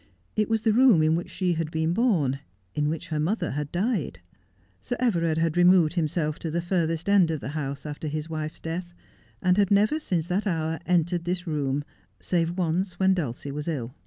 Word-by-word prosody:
It 215 -1 +1
was 225 -1 +1
the 220 -3 +3
room 235 -9 +6
in 155 +1 +3
which 175 - -3
she 180 -2 0
had 165 -1 -2
been 160 +1 0
born, 175 - +2 0.3
in 150 0 0
which 165 +2 -4
her 155 -2 -1
mother 175 +3 0
had 145 +1 -3
died. 180 - -1 0.6
Sir 245 - -3
Everard 170 -10 +1
had 165 -1 +1
removed 175 -2 +5
himself 155 -2 -1
to 165 - -4
the 165 +2 -1
furthest 170 -1 -1
end 200 -4 +5
of 160 -2 -1
the 130 - -6
house 140 -2 -4
after 150 +1 -5
his 155 +1 -3
wife's 155 -1 -5
death, 175 +2 -5 0.5
and 180 0 +3
had 200 -2 +3
never 210 +9 +3
since 175 - -1
that 185 +5 -1
ho 160 -5 0
un - - -5
entered 175 0 +1
this 180 +1 -2
room 145 -3 -1 0.4
save 170 0 0
once 180 +1 -1
when 190 0 +4
Dulcie 145 -5 -3
wa3 150 +2 -5
ill. 130 -7 -3
165 Hz, 205 wpm, -26 LUFS, 155-185 Hz, 0.6 s, room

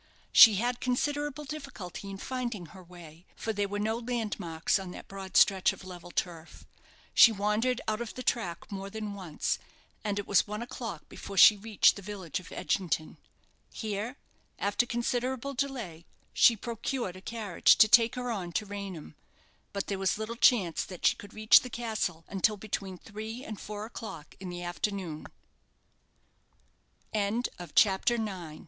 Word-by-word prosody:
She 220 -3 +10
had 240 +4 0
considerable 290 +3 -1
difficulty 270 -10 -7
in 195 - -6
finding 240 -5 -4
her 190 -1 -12
way, 170 -1 -14
for 220 - -3
there 205 -1 0
were 205 +1 -4
no 220 +2 -1
landmarks 210 -9 -1
on 190 -1 -7
that - - -9
broad 195 -1 -4
stretch 190 -2 +5
of - - -12
level 175 -1 -9
turf. 170 -2 -4 0.5
She 235 - +9
wandered 215 +4 0
out 215 +1 -1
of 235 - -6
the 255 - -6
track 180 -10 -2
more 195 0 -5
than 215 0 -5
once, 180 -6 -2 0.4
and 205 -2 -1
it 205 - -2
was 200 0 +3
one 210 +2 -4
o'clock 230 -9 -7
before 195 - -9
she 210 - +10
reached 210 0 +3
the - - -7
village 190 -4 -5
of 185 - -13
Edgington. 165 -5 -2 0.5
Here, 220 +4 -4 0.4
after 205 +4 +1
considerable 245 +3 -1
delay, 240 -12 -4 0.3
she 230 - +6
procured 235 -2 -3
a 185 - -11
carriage 215 -4 +3
to 215 - +7
take 230 +1 +5
her 250 -1 -3
on 180 -6 -4
to 215 - -1
Raynham; 195 - -7 0.6
but 200 -1 -3
there 195 -1 -3
was 195 +1 +1
little 220 +2 -4
chance 205 -8 +3
that 180 -2 -7
she - - +5
could 205 0 -12
reach 215 -1 +7
the 250 - -8
castle 215 -9 -3
until 205 +2 +1
between 195 -2 -4
three 220 +5 -7
and 215 -2 -7
four 210 0 -6
o'clock 220 -9 -8
in 190 -1 -6
the 175 0 -6
afternoon. 175 -2 -3 1.9
CHAPTER 210 +1 +1
X. 245 - -1
"HOW - - -5
ART 190 +4 +3
THOU 240 - +4
LOST! 220 -1 -1
HOW 180 -5 -7
O 155 - -11
205 Hz, 175 wpm, -30 LUFS, 185-230 Hz, 1.9 s, She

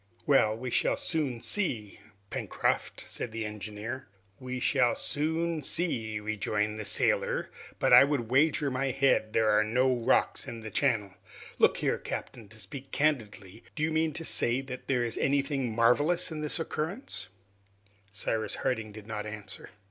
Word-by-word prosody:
"Well, 110 -7 +4
we 125 +1 -5
shall - - +2
soon 140 -8 -1
see, 120 - -1 0.3
Pencroft," - - -1
said 120 - -3
the 110 0 -3
engineer. 105 +4 -6 0.3
"We 130 0 -4
shall 125 -1 +3
soon 160 +2 0
see," 115 -9 -1
rejoined 105 0 -1
the 110 - -4
sailor, - - +1 0.3
"but - - +3
I - - +11
would 140 -5 -1
wager 145 +1 +3
my 130 +1 0
head 125 -4 +2
there 110 -1 +3
are 105 0 +4
no 125 +4 +2
rocks 120 -2 +1
in 115 -1 -6
the 110 -1 -7
channel. 110 -9 +1 0.5
Look - - +5
here, - - 0
captain, 115 -4 -6
to 110 - -12
speak 120 +7 -7
candidly, 110 -8 -1
do 155 - -2
you 160 - +1
mean 160 0 +1
to 165 +2 -3
say 120 -2 +1
that 130 -2 -8
there 125 -3 +2
is 115 -1 -2
anything 140 -3 +1
marvelous 145 +10 +3
in 155 -1 -4
the 150 - -1
occurrence?" 165 - -4 0.8
Cyrus 110 +1 -2
Harding 110 -4 -1
did 105 0 -10
not 105 -1 -4
answer. 105 -1 -7
125 Hz, 160 wpm, -29 LUFS, 110-145 Hz, 0.8 s, I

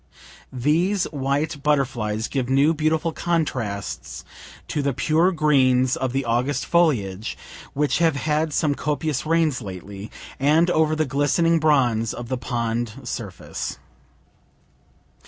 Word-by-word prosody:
These 165 +10 +1
white 145 +2 -1
butterflies 120 -7 0
give 130 -3 -2
new 140 +4 +4
beautiful 155 +1 0
contrasts 130 - -3 0.4
to 150 - -1
the 140 -1 0
pure 160 +8 +2
greens 130 -5 +3
of 130 -6 -2
the 135 +1 -1
August 125 +4 0
foliage, 115 - +1 0.4
(we 150 +1 +2
have 165 -3 +3
had 155 +2 0
some 150 0 +1
copious 150 0 -2
rains 160 -5 +2
lately,) 100 +1 -8 0.3
and 155 +6 +3
over 155 -2 +2
the 155 0 +1
glistening 145 +4 +2
bronze 125 -8 +2
of 120 -1 -7
the 130 - -1
pond 120 -2 -2
surface. 110 -6 -5
140 Hz, 120 wpm, -23 LUFS, 120-155 Hz, 0.4 s, new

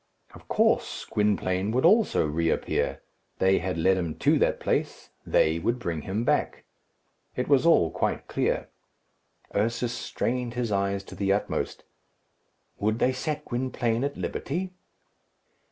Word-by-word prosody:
Of - - -15
course, - - +1
Gwynplaine 100 -2 0
would 130 +5 +2
also 210 - +4
reappear. 80 +2 -1 0.3
They 95 +1 +3
had 90 0 -3
led 95 +3 +3
him 85 -4 -2
to - - +3
that - - +2
place; - - -2 0.2
they 80 +1 +3
would 115 +8 0
bring 85 -10 -3
him 100 +8 -2
back. - - 0 0.7
It 125 - -2
was 140 +2 +4
all 85 - +5
quite - - -1
clear. - - -1 0.8
Ursus 115 +3 0
strained 125 0 -2
his 120 -3 -1
eyes 100 0 0
to - - -12
the 100 -1 0
utmost. 100 - -1 1.0
Would 110 +2 +1
they 130 +2 +2
set 150 +3 -3
Gwynplaine 120 -1 -1
at 140 0 -2
liberty? 180 +6 -3
110 Hz, 135 wpm, -27 LUFS, 95-125 Hz, 1.0 s, all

